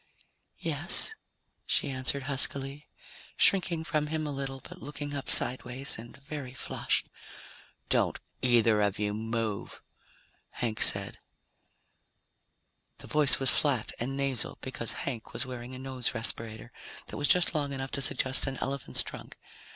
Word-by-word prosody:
"Yes?" 445 - 0 0.5
she 145 - +1
answered 130 +1 -2
huskily, 140 +1 0 0.5
shrinking 175 -4 +4
from 150 -2 0
him 155 0 -1
a 150 - -2
little, 135 -1 -4
but 180 +7 -11
looking 145 0 -5
up 140 -1 -4
sideways, 130 +1 +1
and 120 +4 -10
very 140 -2 -6
flushed. - - 0 0.8
"Don't - - +2 0.2
either 115 -4 +5
of 100 0 +2
you 105 0 0
move," 110 -1 -2 0.7
Hank 115 -3 -2
said. - - +3 1.8
The - - -10
voice 150 -3 +4
was 135 -2 +3
flat 135 -7 +2
and 135 +3 -2
nasal 135 -4 -1
because 115 -3 -3
Hank 120 -5 -4
was - - -2
wearing 125 0 -6
a - - -6
nose 130 -2 -2
respirator 115 0 -1 0.4
that - - -5
was 145 - +2
just 180 -1 +6
long 145 -3 +1
enough 135 -1 -4
to 140 - -1
suggest 130 0 +2
an 135 -1 -2
elephant's 140 -1 -2
trunk. - - -8
135 Hz, 140 wpm, -30 LUFS, 120-140 Hz, 1.8 s, just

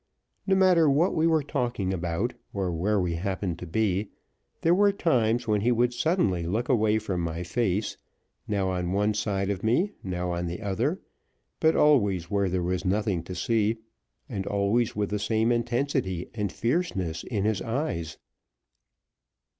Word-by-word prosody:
No 195 - +4
matter 180 -5 +5
what 150 +6 +3
we 160 +1 +2
were 160 -2 +3
talking 120 -9 -1
about, 85 -2 -2 0.2
or 95 -2 -1
where 100 +5 +1
we 90 -2 0
happened 90 0 -3
to 90 - -7
be, 100 +2 0 0.5
there 165 - +4
were 200 +2 +4
times 120 - +1
when 105 -2 +2
he 120 +4 +2
would 120 +1 +2
suddenly 120 - +1
look 105 +9 -1
away 110 -4 +3
from 100 -5 -2
my 85 +1 -3
face, 100 +2 -1 0.5
now 100 -2 0
on 90 -1 -2
one 105 +2 +2
side 100 -2 -1
of 95 -2 -3
me, 130 - +2
now 90 -1 -3
on 85 0 -2
the 85 +1 -4
other, 120 - -1 0.6
but 160 -1 +3
always 100 - +3
where 100 -2 +1
there 90 0 -1
was 90 +1 -1
nothing 100 -2 0
to 90 - -6
see, 110 +3 +1 0.5
and 100 -8 -4
always 100 +4 +1
with 105 -1 -1
the 105 - -1
same 110 +3 +1
intensity 120 -6 -1
and 105 -4 -2
fierceness 110 - -1
in 105 -4 -2
his 105 -3 0
eyes. 115 - -3
105 Hz, 165 wpm, -27 LUFS, 95-120 Hz, 0.6 s, matter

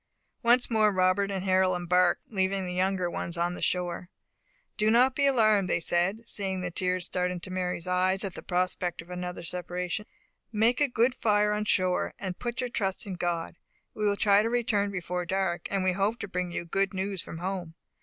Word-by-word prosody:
Once 240 +1 +4
more 215 -2 +3
Robert 185 +1 +2
and 190 -2 -3
Harold 185 -1 +3
embarked, 180 0 +2
leaving 190 -2 0
the 180 - -4
younger 185 0 +1
ones 170 0 -4
on 175 +1 0
the - - -8
shore. 180 0 -1 0.7
"Do 215 +1 +2
not 250 +3 +5
be 280 0 +2
alarmed," 215 -7 +3
said 175 +5 +1
they, 230 - -19
seeing 195 -4 -3
the 180 0 -3
tears 180 0 0
start 180 0 -1
into 180 +1 -5
Mary's 180 -2 -2
eyes 185 +2 +1
at 195 -3 -4
the - - -8
prospect 180 -1 -1
of 175 - -15
another 180 -1 -5
separation. 180 +3 -4 0.4
"Make 230 +4 +2
a 290 - +5
good 245 0 +2
fire 210 -4 +2
on 210 0 -1
shore, 185 -3 +1
and 190 -2 -5
put 240 +1 -3
your 250 -1 -3
trust 195 -4 -1
in 195 - -5
God. 170 -2 -3 0.3
We 215 - -4
will 200 0 +1
try 200 +1 +5
to 225 - 0
return 225 -4 +1
before 180 -2 -3
dark; 180 -1 -1
and 195 -2 0
we 185 - +3
hope 200 +5 0
to 205 - -4
bring 180 -1 -2
you 175 - -4
good 195 +2 0
news 190 -1 -1
from - - -8
home. 180 -2 -4
190 Hz, 205 wpm, -28 LUFS, 180-210 Hz, 0.7 s, not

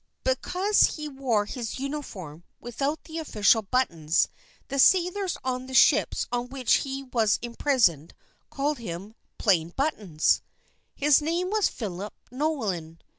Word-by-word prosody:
Because 415 -5 +1
he 305 -1 -5
wore 260 -7 0
his 235 0 -5
uniform 215 - -6 0.2
without 275 +6 -3
the 325 0 -6
official 225 -7 +3
buttons, 180 -9 +1 0.4
the 275 +1 -3
sailors 365 +4 +3
on 255 0 -3
the 260 - -6
ships - - +4
on 245 0 -2
which 260 -2 +2
he 270 0 -4
was 230 -5 +1
imprisoned 235 - +1 0.3
called 290 0 -1
him 195 0 -7 0.2
"Plain 170 -5 +2
Buttons." 210 - +1 0.5
His 295 0 +4
name 340 +5 -1
was 425 -3 +3
Philip 200 -2 -6 0.2
Nolan. 215 - -2
255 Hz, 125 wpm, -26 LUFS, 205-295 Hz, 0.5 s, ships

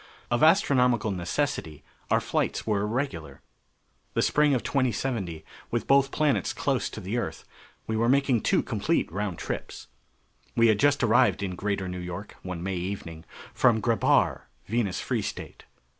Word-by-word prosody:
Of 120 - +1
astronomical 125 - +4
necessity, 85 - -2 0.3
our - - +4
flights - - -1
were 105 -2 +1
irregular. 105 - -3 0.7
The - - +2
spring 150 -2 +3
of 125 - -1
2070, 115 - -1 0.2
with 120 - -1
both 135 0 +4
planets 150 -1 +1
close 135 -3 -1
to - - -8
the 105 +4 -3
Earth, 110 - -5 0.4
we 110 - -2
were 115 +2 +2
making 135 -3 +3
two - - +2
complete - - -1
round 100 -1 -3
trips. - - -6 0.7
We 115 0 +5
had 105 -2 +3
just 145 -1 +3
arrived 110 -4 +3
in 95 -2 -2
Greater 100 0 -2
New 90 0 -5
York, 90 +3 -7
one 90 -2 -6
May 95 -1 -2
evening, 85 -3 -5 0.3
from 120 -4 +3
Grebhar, 115 0 +2 0.2
Venus 110 -3 -1
Free - - -1
State. - - -7
110 Hz, 155 wpm, -27 LUFS, 95-130 Hz, 0.7 s, We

